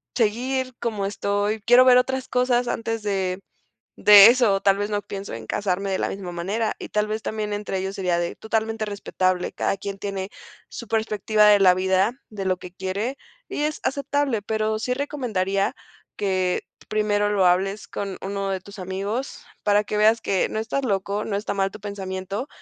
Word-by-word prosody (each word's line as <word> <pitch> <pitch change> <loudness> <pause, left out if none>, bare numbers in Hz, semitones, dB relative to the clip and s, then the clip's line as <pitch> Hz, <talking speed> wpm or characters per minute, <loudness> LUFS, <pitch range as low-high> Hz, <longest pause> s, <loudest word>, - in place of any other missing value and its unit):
seguir 255 +3 0
como 210 -4 -2
estoy 205 +2 -1
quiero 245 +2 +7
ver 250 -1 +7
otras 260 +1 0
cosas 250 -1 +1
antes 225 0 -2
de 190 -3 -1 0.6
de 205 -1 +9
eso, 230 -5 +4
tal 195 -1 +3
vez 205 +1 -2
no 205 -1 -1
pienso 195 - -7
en 110 -1 -8
casarme 195 -1 -1
de 190 - -1
la - - 0
misma 185 -3 -6
manera. 200 +6 -2
Y - - -6
tal 210 0 0
vez 215 +1 -3
también 215 -1 -3
entre 205 -2 -3
ellos 190 +1 -3
sería 180 -3 0
de 170 0 -2
totalmente 220 0 -2
respetable, 185 -3 -1
cada - - -1
quien 195 0 -6
tiene 195 0 -4 0.4
su 235 - -9
perspectiva 215 -1 +2
de 205 -1 +6
la 185 -2 +6
vida, 190 +3 +2 0.2
de 200 -3 -6
lo 185 -1 +1
que 180 0 -11
quiere, 200 +8 -3 0.3
y 295 - -3
es 305 +1 -1
aceptable. 280 -4 0
Pero, 215 0 -1
sí 250 +2 -1
recomendaría 215 -9 -1 0.4
que 185 -2 0 0.3
primero 210 -1 +1
lo 195 -3 +3
hables 195 +3 +1
con 195 -2 -5
uno 195 0 -3
de 190 -1 -2
tus 200 +1 -11
amigos, 200 +8 -4 0.2
para 205 0 +3
que 210 - -3
veas 220 +2 +4
que 190 -2 0
no 215 - -4
estás 260 +5 -2
loco, 200 -1 -1
no 200 - -2
está 205 0 -3
mal 195 0 0
tu - - -10
pensamiento, 195 +3 -5
205 Hz, 185 wpm, -23 LUFS, 195-225 Hz, 0.6 s, de